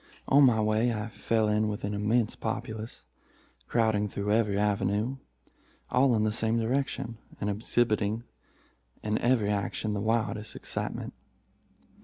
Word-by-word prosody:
On 140 +1 +6
my 120 -4 +5
way 110 +2 +2
I 110 0 -3
fell 110 0 0
in 105 0 +2
with 105 -1 -4
an 100 +1 -2
immense 105 +2 +1
populace, 110 0 -5 0.6
crowding 110 -3 +2
through 100 +1 -2
every 105 -3 +2
avenue, 105 +4 0 0.7
all 125 0 +4
in 110 - +2
the 110 - +2
same 110 +1 +1
direction, 115 -1 -1 0.2
and 105 0 -1
exhibiting 110 0 0 0.8
in 105 0 0
every 120 -4 +2
action 105 +1 -2
the 100 - -2
wildest 110 -1 -1
excitement. - - -4
110 Hz, 135 wpm, -29 LUFS, 105-115 Hz, 0.8 s, On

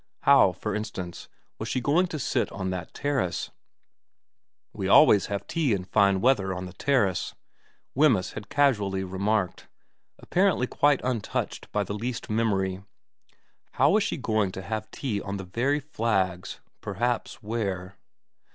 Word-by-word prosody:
How, 140 -9 +6
for 100 +4 -4
instance, 95 -5 -5 0.3
was - - -4
she - - 0
going 155 +9 +2
to 165 - -5
sit 135 - -1
on 95 -1 -3
that 90 -3 -5
terrace, 135 -11 -2 0.6
' - - -59
We - - -3
always 100 - +6
have 100 -1 -3
tea 155 -8 0
in 95 -2 -1
fine 100 0 +3
weather 100 -7 +2
on 90 +1 -5
the 90 - -9
terrace,' 100 - 0 0.6
Wemyss 125 -10 +3
had 105 -1 -8
casually 105 -10 +2
remarked, 95 +1 -1 0.5
apparently 185 -8 +1
quite 145 +2 +2
untouched 125 -5 -3
by 105 - +1
the 100 - -5
least 115 +2 -4
memory 95 -4 0 0.9
how 140 +4 +4
was 215 - +4
she 195 - -1
going 110 -7 0
to 95 - -6
have 110 +3 -4
tea 110 -7 -3
on 100 0 -4
the 95 - -6
very 120 +10 0
flags 95 - -1 0.2
perhaps 120 +5 -2
where. 100 -4 -3
105 Hz, 150 wpm, -26 LUFS, 95-130 Hz, 0.9 s, How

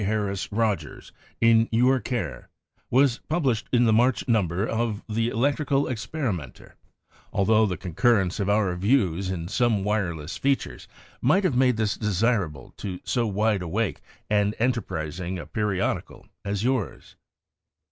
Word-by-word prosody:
Harris 100 -1 -2
Rogers, 110 -1 -2 0.3
in 115 0 +4
your 125 +3 +3
care, 100 - -4 0.4
was 130 -1 +3
published 135 -9 0
in 120 -1 +4
the 110 - +4
march 120 -1 +2
number 100 -5 +1
of 115 -2 -2
the 115 +1 0
Electrical 140 +3 +1
Experimenter, 110 - -4 0.6
altho 110 +2 +3
the 90 -3 -3
concur 110 +7 +2
rence 90 +4 -5
of 100 0 0
our 100 -3 +2
views 95 -3 +1
in 85 -3 -3
some 110 0 +1
wireless 90 -7 -2
fea 140 0 +3
tures - - -10 0.3
might 180 +11 +3
have 175 -9 +1
made 125 -2 +3
this 110 -2 0
desirable 100 - -1
to 95 -3 -5
so 120 -3 0
wide 105 0 +1
awake 100 +5 -2 0.3
and 105 0 +1
enterprising 95 -7 -2
a 85 - -7
periodical 105 -3 -2 0.2
as 100 0 -2
yours. 125 -7 -2
110 Hz, 140 wpm, -25 LUFS, 95-120 Hz, 0.6 s, in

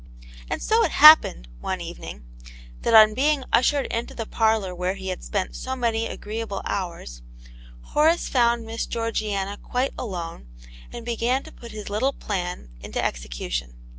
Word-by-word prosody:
And - - -3
so 455 +1 +3
it - - 0
happened, 300 - +8
one - - -3
evening, - - -8 0.6
that 230 - +2
on 215 -1 +8
being 280 +3 +1
ushered 270 +4 +3
into 230 +1 -3
the 225 - -4
parlour 220 -4 +1
where 180 +2 -2
he 190 -1 -6
had 185 - -5
spent 195 -3 -3
so 260 0 -4
many 230 -2 0
agreeable 215 -2 -5
hours, 170 - -4 0.7
Horace 320 +3 +3
found 235 -2 +2
Miss 225 +1 -4
Geor 230 0 -2
giana 200 -2 -2
quite 255 +2 -1
alone, 170 - -6 0.4
and 235 - -8
began 240 +3 0
to - - -12
put 235 - -12
his 215 -1 -8
little 230 +7 0
plan 180 - -4
into - - -5
execution. - - -4
220 Hz, 160 wpm, -24 LUFS, 185-240 Hz, 0.7 s, happened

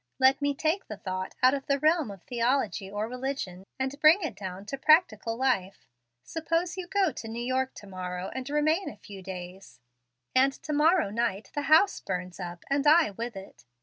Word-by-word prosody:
Let 265 +1 +4
me 285 0 +1
take 320 +7 -1
the 215 - -7
thought 185 0 -5
out 255 +1 +7
of 275 -1 -3
the 280 - +2
realm 310 -2 +2
of 195 -3 -10
theology 235 -5 0
or 205 +2 -3
religion, 250 -7 -5
and 265 +2 -3
bring 325 +5 +6
it 300 -7 -3
down 190 0 -7
to 275 - -5
practical 250 - +3
life. 215 - 0 0.4
Suppose 330 - -1
you 370 -2 -5
go 385 -2 +2
to 225 - -8
New 230 +2 -4
York 260 +1 -1
to - - -11
morrow 185 -1 -5
and 260 +1 -5
remain 310 +5 +1
a 210 - -11
few 200 -1 -11
days, 185 -3 -9 0.5
and 270 +1 +4
to 305 - -6
morrow 310 - +3
night 215 -3 -2
the 290 - -1
house 325 +6 +5
burns 180 -1 -5
up, 175 -1 -7
and 280 +1 +1
I 315 -5 +6
with 230 +3 -5
it. 195 -9 -11
255 Hz, 195 wpm, -28 LUFS, 195-300 Hz, 0.5 s, out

